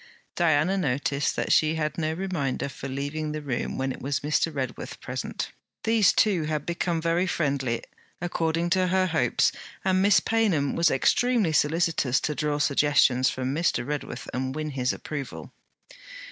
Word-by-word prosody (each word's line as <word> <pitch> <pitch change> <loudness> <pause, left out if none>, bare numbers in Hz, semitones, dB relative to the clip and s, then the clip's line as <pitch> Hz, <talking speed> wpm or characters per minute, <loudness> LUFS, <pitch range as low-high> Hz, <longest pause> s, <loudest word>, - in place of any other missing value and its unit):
Diana 170 +3 +2
noticed 140 -2 0
that - - -1
she 155 0 +4
had 155 -1 -2
no 160 -1 -1
reminder 160 -7 -2
for 140 - -7
leaving 145 +3 -3
the 155 - -4
room 130 -4 -3
when 135 0 -1
it - - -8
was 140 0 -1
Mr. 155 +2 +1
Redworth 130 -4 -5
present. - - -4 0.3
These 220 -4 +4
two 185 -7 +2
had 150 -1 -2
become 170 0 -1
very 170 +3 +1
friendly, 135 -8 -1 0.4
according 170 0 -1
to 185 0 +3
her 185 +1 +2
hopes; 160 -9 +2 0.3
and 190 0 +3
Miss 200 0 +5
Paynham 195 -12 +1
was 170 - +4
extremely 230 - +2
solicitous 150 -4 +2
to 150 - -1
draw 150 0 -1
suggestions 140 -3 +3
from 130 +1 -3
Mr. 155 -6 0
Redworth 145 +1 -5
and 130 +1 -2
win 155 -1 -3
his 125 -2 0
approval. 145 -4 -6
155 Hz, 160 wpm, -26 LUFS, 140-175 Hz, 0.4 s, Miss